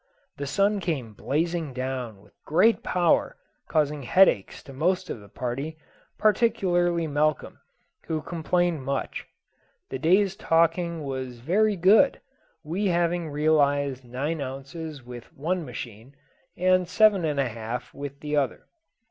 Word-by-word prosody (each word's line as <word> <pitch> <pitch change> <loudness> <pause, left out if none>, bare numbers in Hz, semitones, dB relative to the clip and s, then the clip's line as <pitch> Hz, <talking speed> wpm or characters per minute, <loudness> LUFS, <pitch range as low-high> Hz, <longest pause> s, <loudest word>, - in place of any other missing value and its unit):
The 140 - -4
sun 200 +7 +2
came 140 - -3
blazing 160 +4 -2
down 125 -5 -4
with 100 -1 -22
great 185 +9 +3
power, 175 -2 +1 0.3
causing 150 -1 +1
headaches 130 - +3
to 135 - -11
most 175 +7 0
of - - -5
the 100 -1 -15
party, 135 +8 -4 0.4
particularly 185 -6 +2
Malcolm, 155 0 -1 0.5
who 155 -1 -2
complained 175 -1 0
much. 135 +1 -3 0.6
The 130 - -3
day's 190 +5 +3
taking 170 -1 +1
was 130 -3 -5
very 200 - +2
good; 200 +10 +5 0.4
we 180 +7 -1
having 170 -2 0
realised 145 -3 +1
nine 140 +6 -3
ounces 140 +2 -7
with 120 -1 -10
one 170 +5 -2
machine, 120 0 -9 0.4
and 185 0 +3
seven 200 0 +4
and 150 -3 0
a 135 - +2
half 115 +2 -6
with 140 0 -7
the 150 0 -2
other. 135 -5 -1
155 Hz, 130 wpm, -26 LUFS, 135-175 Hz, 0.6 s, good